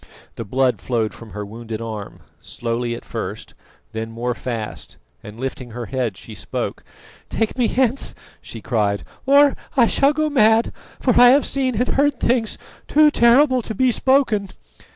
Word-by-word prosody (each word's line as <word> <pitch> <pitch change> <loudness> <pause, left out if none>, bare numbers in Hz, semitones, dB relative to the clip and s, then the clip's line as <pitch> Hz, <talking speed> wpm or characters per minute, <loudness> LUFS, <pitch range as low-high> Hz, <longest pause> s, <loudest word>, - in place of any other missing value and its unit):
The - - -6
blood 130 +4 0
flowed 115 -4 -1
from 115 - -12
her 105 +1 -6
wounded 110 +1 -7
arm, 110 -3 -7 0.2
slowly 120 0 -3
at - - -11
first, - - -6 0.4
then 110 0 -5
more 120 +2 -3
fast, 115 -3 -6 0.2
and 105 +2 -11
lifting 130 -1 -5
her 120 +1 -6
head 125 -5 -3
she - - -10
spoke. - - -5 0.5
"Take 225 -1 -1
me 245 -3 +2
hence," 255 +2 0 0.3
she 115 - -10
cried, 105 -3 0 0.2
"or 280 +1 +6 0.2
I 240 - +6
shall 275 +4 +3
go 310 +1 0
mad; 225 -5 +3 0.3
for 255 - +2
I 245 - +9
have 280 +3 +4
seen 260 -3 -1
and 245 +4 0
heard 285 -2 +1
things 235 -2 0 0.3
too 300 0 +5
terrible 255 +1 +4
to 220 -1 -6
be 255 +3 +3
spoken!" 240 -6 +2
195 Hz, 165 wpm, -21 LUFS, -, 0.5 s, I